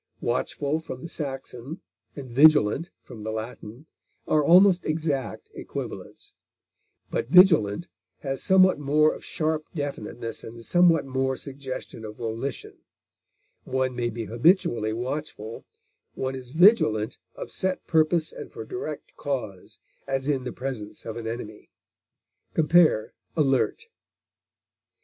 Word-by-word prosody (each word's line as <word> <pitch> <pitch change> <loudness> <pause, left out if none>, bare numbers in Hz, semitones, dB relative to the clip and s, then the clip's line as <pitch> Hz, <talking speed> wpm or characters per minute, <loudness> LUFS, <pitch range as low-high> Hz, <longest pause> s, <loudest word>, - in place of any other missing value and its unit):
Watchful, 145 +2 -1
from 130 -5 -8
the - - -5
Saxon, 135 -1 -6 0.4
and 140 -3 -7
vigilant, 145 +3 +5
from 115 -4 -11
the 110 - -4
Latin, 110 +3 -7 0.4
are 155 -1 +3
almost 180 +2 +6
exact 150 - -2
equivalents; - - -7 0.8
but 115 - -2
vigilant 170 - +5 0.3
has 135 -1 -3
somewhat 190 -4 +5
more 150 +2 +3
of - - -10
sharp 155 -1 -1
definiteness 120 -6 -5
and 115 0 -10
somewhat 175 -4 +4
more 130 0 -1
suggestion 135 -4 -7
of 105 0 -7
volition; 115 +3 -5 0.8
one 130 -1 -1
may 120 -1 -1
be 115 0 -5
habitually 120 - +2
watchful; 120 -2 -5 0.5
one 130 0 -2
is 130 -2 -8
vigilant 155 - +4 0.2
of - - -7
set 185 0 -2
purpose 160 0 +2
and - - -9
for 110 - -8
direct 155 0 -6
cause, 120 -10 -5 0.3
as 135 0 -2
in 135 -4 0
the 125 - -3
presence 120 -6 -6
of 110 - -5
an 115 -1 -5
enemy. 110 -2 -7 0.9
Compare 160 -7 +4 0.2
ALERT. 140 - +2
135 Hz, 120 wpm, -26 LUFS, 115-155 Hz, 0.9 s, almost